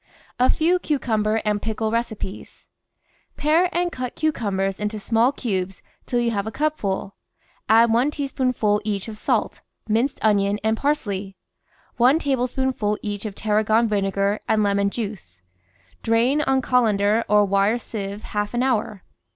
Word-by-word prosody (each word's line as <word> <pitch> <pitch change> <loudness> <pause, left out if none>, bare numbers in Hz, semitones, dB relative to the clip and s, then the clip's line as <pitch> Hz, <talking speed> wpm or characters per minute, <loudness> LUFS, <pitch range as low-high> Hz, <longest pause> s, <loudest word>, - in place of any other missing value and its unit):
A 250 - +5
FEV^ 350 +3 +2
CUCUMBER 225 -6 0
AND 210 -1 0
PICKLE 220 0 -2
RECIPES 225 -4 -4 0.7
Pare 320 +5 +3
and 350 0 0
cut 255 -3 -5
cucumbers 195 -11 -1
into 210 +1 -3
small 230 +4 +2
cubes 190 -8 -3 0.2
till 245 - 0
you 235 -1 +1
have 205 -1 -2
a - - -3
cupful; 215 -10 -2 0.6
add 225 +1 +5
one 245 +5 +3
teaspoonful 255 -7 0
each 205 -2 -3
of 220 - -7
salt, 210 - -1 0.3
minced 230 +6 +1
onion, 205 -1 +2
and 220 0 +2
parsley; 205 -9 -2 0.6
one 250 +5 +5
tablespoonful 260 -6 -1
each 205 0 -4
of 200 - -8
tarragon 215 +2 +2
vinegar 200 0 0
and 215 -1 +3
lemon 200 0 +2
juice. 195 - -7 0.6
Drain 240 +6 +2
on 265 -3 +1
col 250 -2 +3
ander 205 +2 +2
or 210 0 +4
wire 200 +3 +2
sieve 205 -3 -6
half 210 +2 -3
an 245 - +1
hour. 215 -6 -1
220 Hz, 145 wpm, -23 LUFS, 205-250 Hz, 0.7 s, A